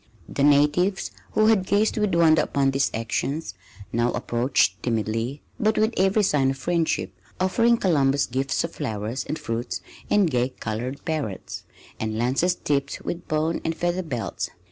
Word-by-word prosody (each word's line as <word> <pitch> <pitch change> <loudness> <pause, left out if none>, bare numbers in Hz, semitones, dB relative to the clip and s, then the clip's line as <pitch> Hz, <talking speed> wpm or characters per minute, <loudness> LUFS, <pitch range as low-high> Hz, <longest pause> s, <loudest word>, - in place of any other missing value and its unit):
The - - -3
natives, 150 +7 +3 0.2
who 215 - +4
had 215 -4 +3
gazed 205 +2 +2
with 210 -5 +1
wonder 160 -2 +5
upon 140 -2 +1
these 135 +1 +1
actions, 115 +3 -2 0.4
now 120 +1 +2
approached 120 +3 +1
timidly 115 +3 -2 0.2
but 215 -2 +2
with 220 +2 +2
every 195 +3 +3
sign 140 -7 +3
of 135 - -2
friendship, 160 - 0 0.3
offering 230 +6 +3
Columbus 140 -8 +2
gifts 135 +2 -1
of 165 - -3
flowers 115 -2 -3
and 155 - -3
fruits 115 +1 -3 0.3
and 205 -3 +4
gay 125 -4 +1
colored 125 +2 -5
parrots, 150 - -4 0.3
and 110 0 -2
lances 135 +10 +1
tipped 140 -3 -1
with 175 0 -4
bone 155 +2 0
and 165 - -1
feather 175 +2 0
belts. 130 -10 -4
145 Hz, 155 wpm, -24 LUFS, 125-180 Hz, 0.4 s, wonder